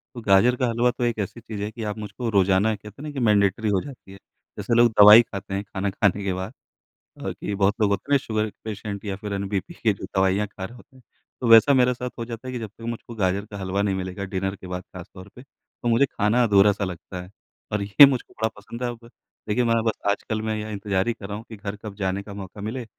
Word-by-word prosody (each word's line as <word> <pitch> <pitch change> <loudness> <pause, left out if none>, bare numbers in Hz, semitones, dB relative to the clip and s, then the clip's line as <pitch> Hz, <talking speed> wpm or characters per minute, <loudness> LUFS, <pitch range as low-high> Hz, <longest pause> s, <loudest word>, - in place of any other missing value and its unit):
तो 120 - -6
गाजर 110 +4 +4
का 125 0 0
हलवा 120 +2 +2
तो 125 - -5
एक 120 -2 0
ऐसी 100 +3 -4
चीज़ 110 -2 -7
है 105 - -2
कि 115 0 -7
आप 105 0 -3
मुझको 110 +3 -5
रोज़ाना 100 +1 +3
कहते 105 +4 -13
हैं - - -8
ना - - -6
कि 140 - -4
मैंडेटरी 105 -1 +2
हो 95 -2 +2
जाती 130 -8 -11
है 95 - -11 0.4
जैसे - - -2
लोग 120 0 +5
दवाई 105 +2 +11
खाते 100 -4 -7
हैं 100 +1 -2
खाना 100 0 -3
खाने 100 0 +1
के 95 -1 -1
बाद 95 +5 -5 0.6
अ, - - -4
कि 105 - -5
बहुत 100 +1 +2
लोग 105 - +4
होते 100 +8 -2
हैं - - +5
ना - - +7
शुगर 110 -1 -1
क - - -20
पेशेंट 105 -1 -5
या 100 -2 -2
फिर 105 +1 -6
एन 100 0 -2
बीपी 105 - -3
के 115 -10 +1
जो 95 - -8
दवाइयाँ 95 +2 +2
खा 95 -1 -7
रहे 120 - -10
होते 125 - -18
हैं 130 - -19 0.4
तो 125 - 0
वैसा 115 +5 +8
मेरे 125 -1 +4
साथ 125 +1 -5
हो 115 - -3
जाता 115 +1 -8
है - - -4
कि 125 - -3
जब 110 -2 -6
तक 110 - -21
मुझको 115 0 -6
गाजर 100 -1 0
का 100 - -6
हलवा 95 +1 -1
नहीं 100 -1 0
मिलेगा 95 +1 -4
डिनर 95 +1 -1
के 95 - -11
बाद 90 0 -5
ख़ास 90 -2 -11
तौर 95 0 -11
पे 125 - -11
तो 135 -2 -11
मुझे 115 +4 +4
खाना 115 0 +1
अधूरा-सा 100 -2 +4
लगता 90 0 -7
है। 90 - -12 0.4
और 105 -1 -1
ये 100 +8 +8
मुझको 135 -3 -1
बड़ा 110 0 -1
पसंद 115 +4 -8
है 125 - 0
अब 120 -1 -7 0.5
देखिए 110 +4 +1
मैं 115 -1 +2
बस 110 -1 +1 0.2
आजकल 110 +2 -1
मैं 110 0 -2
ये 110 0 -5
इंतज़ार 100 -1 -1
ही 120 - +1
कर 105 -3 -9
रहा 105 0 -5
हूँ 110 - -9
कि 110 - -8
घर 100 0 -5
कब 105 -2 -7
जाने 95 -1 -2
का 100 - -10
मौका 100 0 -9
मिले, 115 +4 -4
105 Hz, 270 wpm, -24 LUFS, 100-115 Hz, 0.6 s, दवाई